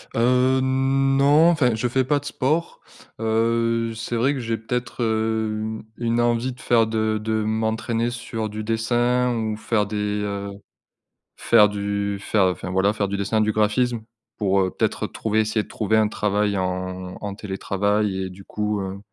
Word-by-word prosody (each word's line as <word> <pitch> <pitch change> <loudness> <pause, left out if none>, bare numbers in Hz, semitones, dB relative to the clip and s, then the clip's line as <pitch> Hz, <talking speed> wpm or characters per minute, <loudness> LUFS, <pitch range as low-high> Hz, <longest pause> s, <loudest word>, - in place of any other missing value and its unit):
Heu, 125 +2 +3
non 135 +4 +3
enfin, 130 -8 +2
je 115 +3 -1
fais 130 +2 +1
pas 145 +3 +1
de 145 - -15
sport. 155 +4 -1 0.4
Heu, 115 +1 +1
c'est 115 +1 -4
vrai 130 +5 +2
que 135 - -4
j'ai 115 -1 -2
peut-être, 125 +2 -3
heu, 110 0 0
une 110 0 -4
une 115 0 0
envie 120 +2 +1
de - - -18
faire, 115 -2 +3
de 110 -1 0
de 110 0 -1
m'entraîner 110 +2 -1
sur 120 -3 -4
du 110 +1 -5
dessin 120 +2 +1
ou 110 -2 -2
faire 110 -1 0
des, 105 +1 -4 0.3
heu, 100 -1 -3 0.9
faire 105 0 +5
du 100 0 -2
faire, 100 -1 +2
enfin, 90 -1 -2
voilà, 95 +3 +2
faire 105 -2 -1
du 100 +1 -3
dessin, 110 +2 0
du 110 0 +2
graphisme. 110 +3 +1 0.4
Pour, 100 -2 +2
heu, 95 - +1
peut-être - - -1
retrouver 110 0 -1
essayer 110 0 +1
de - - -16
trouver 110 0 0
un 110 -1 +4
travail 105 -1 0
en 95 0 -3
en 100 -1 -5
télétravail 100 0 -1
et - - -5
du 95 +1 -12
coup, 105 +1 -2
heu, 95 +1 -5
110 Hz, 175 wpm, -23 LUFS, 105-120 Hz, 0.9 s, faire